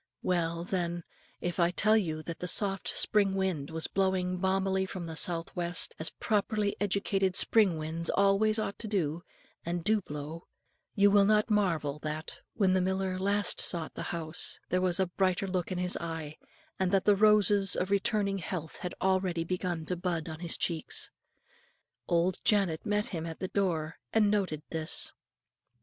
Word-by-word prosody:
Well, 170 -2 0
then, 175 -2 -2 0.4
if 175 +1 -3
I 170 0 +4
tell 215 +4 +3
you 160 -7 -1
that 165 0 -6
the 180 - -4
soft 195 +1 +2
spring 200 -2 +2
wind 185 -7 -1
was 160 0 -3
blowing 190 -1 0
balmily 190 0 +1
from 185 -2 -6
the 165 -1 -6
south 165 0 0
west, 175 -1 -1
as 160 - -1
properly 210 -1 -1
educated 195 -1 0
spring 205 -8 +4
winds 160 +2 +1
always 200 +2 +3
ought 215 -2 -3
to, 175 -8 -1 0.4
and 170 0 -3
do 215 +2 +2
blow, 150 +1 -7 0.5
you 200 0 +5
will 200 -1 +5
not 215 +2 +3
marvel 165 -8 +1
that, 155 +1 -5
when 195 -4 +3
the 185 - +3
miller 190 0 -1
at 185 - -4
last 200 0 +1
sought 165 -2 0
the - - -6
house, 160 -2 -1
there 185 - +1
was 180 0 +3
a 190 - +3
brighter 185 +1 0
look 185 -1 -2
in 185 - -2
his 180 0 0
eye, 160 -2 -5 0.4
and 190 -1 +1
that 195 -1 +2
the 205 - +5
roses 205 -2 +4
of 185 +2 -2
returning 200 0 +1
health 170 -3 -5
had 180 - -5
already 185 -3 +1
begun 175 -2 -3
to 180 - -2
bud 175 -2 -2
on 160 -1 -6
his 170 -1 -2
cheeks. 165 -3 0 1.0
Old 175 +1 +1
Janet 195 -3 +2
met 210 +1 0
him 165 -3 -4
in 165 - -5
the 185 - -3
door, 165 -5 -1
and 210 -2 +3
noted 185 -8 -1
this. 160 -1 -1
185 Hz, 175 wpm, -30 LUFS, 165-200 Hz, 1.0 s, you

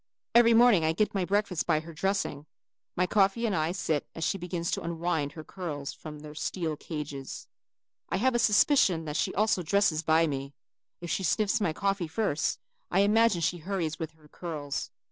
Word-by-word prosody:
Every 235 -1 +6
morning 230 -7 +6
I 160 0 +2
get 210 +5 0
my 195 -3 0
breakfast 200 -3 0
by 155 -3 +2
her 165 +1 -10
dressing. 180 -4 -2 0.5
My 180 - +2
coffee 200 +4 +2
I 165 -6 0
start 160 -5 -1
as 165 - -4
she 195 - 0
begins 175 -1 -3
to - - -1
unwind 165 -3 -2
her 155 - -8
curls 155 -6 -5
from 155 -1 -9
their 150 0 -9
steel 160 0 -3
cages. 145 -4 -6 0.6
I - - 0
have 260 +5 +2
a 240 - +2
suspicion 210 - +4
that 150 -1 -4
she - - 0
also 210 -2 +2
dresses 175 -2 +2
by 160 +1 +3
me. 140 -2 -4 0.5
If 175 - -5
she - - 0
sniffs 210 +4 +1
my 175 - +1
coffee 195 +1 -1
first, 160 -4 -1 0.3
I 190 - +3
imagine 210 -2 +3
she 175 +2 0
hurries 165 -3 -3
with 160 -1 -5
her 155 -1 -21
curls. 150 -3 -5
170 Hz, 185 wpm, -28 LUFS, 155-200 Hz, 0.6 s, Every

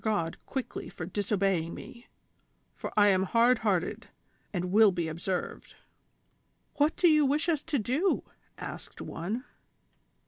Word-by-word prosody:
229 205 -7 0
God - - -39
quickly 265 -2 -4
for 160 - -6
disobeying 195 -3 0
me, 240 -1 -11 0.7
for - - -6
I 205 0 +7
am 190 -1 +3
hard 230 +5 +4
hearted 195 -6 -1 0.4
and 180 -2 -2
will 215 0 +7
be 175 -3 -2
observed." 175 +3 -4 0.5
" - - -44
What 300 +3 +3
do 355 - +4
you 305 -2 +5
wish 290 +4 +1
us 315 -4 +1
to 310 -2 -1
do 270 - +1
V - - -29 0.2
" - - -40
asked - - -8
one. 205 +10 -4
210 Hz, 160 wpm, -29 LUFS, 180-265 Hz, 0.7 s, I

